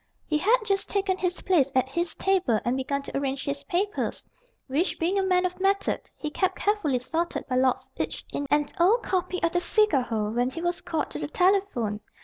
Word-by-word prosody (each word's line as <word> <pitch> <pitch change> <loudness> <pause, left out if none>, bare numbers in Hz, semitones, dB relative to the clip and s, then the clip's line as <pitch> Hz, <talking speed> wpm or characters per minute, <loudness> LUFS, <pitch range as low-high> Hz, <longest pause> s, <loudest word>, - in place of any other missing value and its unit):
He 305 -2 0
had 440 +9 +4
just 395 -2 0
taken 390 -2 +1
his 360 0 -1
place 290 -8 +3
at 260 0 +3
his 340 +6 -2
table 370 - +2
and 240 +1 +1
begun 275 +1 -2
to - - -8
arrange 275 -1 -1
his 280 0 -3
papers, 395 +7 -1 0.4
which, 295 +8 0
being 360 +4 +1
a - - +1
man 365 -1 +2
of 365 0 -3
method, 390 +1 0
he 300 - -4
kept 375 +4 0
carefully 405 -11 +1
sorted 330 +7 -2
by 255 -2 0
lots 255 0 +2
each - - -3
in 285 - -2
an 295 +1 +3
old 410 +8 +4
copy 365 -1 -1
of 335 - +3
the 350 0 +1
Figaro, 255 - +1
when 245 +2 +1
he 315 - -7
was 345 +1 -1
called 320 -2 -2
to - - -3
the - - -2
telephone. 360 - +1
340 Hz, 205 wpm, -26 LUFS, 270-380 Hz, 0.4 s, had